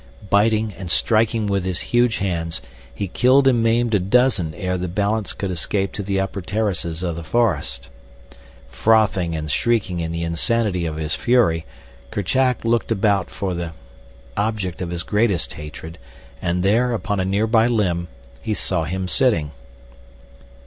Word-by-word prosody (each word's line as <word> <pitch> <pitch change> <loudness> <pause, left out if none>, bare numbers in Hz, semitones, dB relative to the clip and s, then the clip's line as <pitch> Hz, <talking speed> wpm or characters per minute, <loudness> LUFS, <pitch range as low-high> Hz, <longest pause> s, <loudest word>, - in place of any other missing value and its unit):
Biting, 110 +1 +3
and 95 -3 -6
striking 110 +5 +2
with 100 -2 0
his 90 -1 -2
huge 120 -1 +1
hands, 85 -6 -2 0.3
he 95 +11 -4
killed 130 +8 +4
and 120 -3 +4
maimed 115 0 +2
a 105 - +4
dozen 100 -5 +2
ere 90 -2 -2
the 90 0 -2
balance 100 +4 0
could 100 -2 -4
escape 95 +3 -1
to - - -3
the 100 0 -1
upper 95 0 -2
terraces 90 -4 -2
of 85 -2 -2
the 85 - -6
forest. 95 - 0 0.8
Frothing 105 -6 +2
and 75 -1 -3
shrieking 105 - +1
in 80 -1 -3
the 85 0 -3
insanity 90 +2 +1
of 80 - -4
his 80 0 -3
fury, 85 -6 +2 0.4
Kerchak 125 +6 0
looked 115 0 +1
about 100 -3 +1
for 95 -2 -3
the 85 -2 -4 0.6
object 100 -5 -2
of 90 - -3
his 85 -1 -3
greatest 100 - 0
hatred, 75 +1 -9 0.4
and 90 +1 0
there, 120 +5 +2
upon 105 -3 -2
a - - +1
near 100 +3 +1
by 110 0 +3
limb, 90 -7 0 0.3
he 110 - -2
saw 85 -5 0
him 95 +4 -3
sitting. 90 - +2
100 Hz, 160 wpm, -21 LUFS, 85-110 Hz, 0.8 s, killed